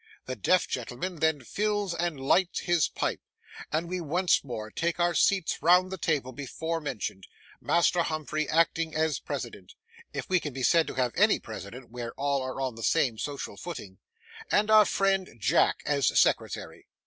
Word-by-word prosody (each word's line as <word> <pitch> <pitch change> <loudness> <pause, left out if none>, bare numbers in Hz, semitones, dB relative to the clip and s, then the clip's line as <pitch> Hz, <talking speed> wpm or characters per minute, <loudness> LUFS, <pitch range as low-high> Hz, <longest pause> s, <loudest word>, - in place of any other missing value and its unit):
The 130 - -4
deaf 180 - +2
gentleman 130 +9 -4
then 155 -3 +1
fills 205 - -1
and 170 -4 -2
lights 175 +7 +2
his 175 -3 +2
pipe, - - -2 0.5
and 160 +3 -1
we 180 +1 -3
once 175 +4 +2
more 110 -5 -6
take 170 +1 -1
our 175 0 +2
seats 185 +2 +2
round 180 +2 +5
the 190 - -4
table 145 -6 0
before 160 +5 -4
mentioned, 105 -9 -5 0.3
Master 170 +1 +3
Humphrey 155 -2 -2
acting 165 0 +1
as 155 -2 +1
president,—if 460 +1 -8
we 185 -1 +3
can 150 -4 -6
be 130 0 -4
said 165 +6 +4
to - - -6
have 125 -2 0
any 210 +3 +4
president, 115 +3 -9
where 120 -1 -6
all 140 -1 0
are 130 +1 -5
on 130 -2 -1
the 115 - -10
same 115 0 +1
social 145 -2 -5
footing,—and 170 - -4
our 215 -1 +8
friend 195 - 0
Jack 110 - +2
as 140 -2 +1
secretary. - - 0
160 Hz, 165 wpm, -28 LUFS, 130-180 Hz, 0.5 s, our